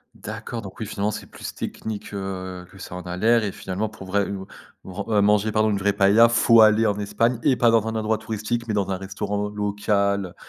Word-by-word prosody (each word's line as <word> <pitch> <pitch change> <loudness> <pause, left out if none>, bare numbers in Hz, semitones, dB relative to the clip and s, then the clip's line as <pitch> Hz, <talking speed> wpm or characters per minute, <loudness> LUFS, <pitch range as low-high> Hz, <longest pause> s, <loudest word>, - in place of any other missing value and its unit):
D'accord 110 +2 -6
donc 95 -2 -10
oui, - - -2
finalement 105 0 -2
c'est - - -6
plus - - -8
technique, 105 -1 -6
heu, 95 -2 -5
que 100 - -16
ça 90 - -8
en 90 - -5
a 90 0 -5
l'air 115 +3 +3
et 100 - -3
finalement, 95 +4 -3
pour 100 -2 -11
vrai 100 +1 +1
ou 95 -1 -5 0.4
vren 95 +2 -6
heu, 105 -2 +3
manger, 105 +1 +3
pardon, 110 0 +3
une 100 - +1
vraie 100 +1 +1
paëlla, 105 +4 +6
faut 115 0 +5
aller 110 +1 +6
en 105 -1 0
Espagne 115 +3 0
et 130 - +4
pas 120 -2 +4
dans 110 -1 +3
un 110 - -3
endroit 110 0 0
touristique 110 +2 -3
mais 110 - -1
dans 100 -2 0
un 95 - -1
restaurant 100 +2 -3
local, 100 -2 -1
105 Hz, 230 wpm, -23 LUFS, 100-110 Hz, 0.4 s, paëlla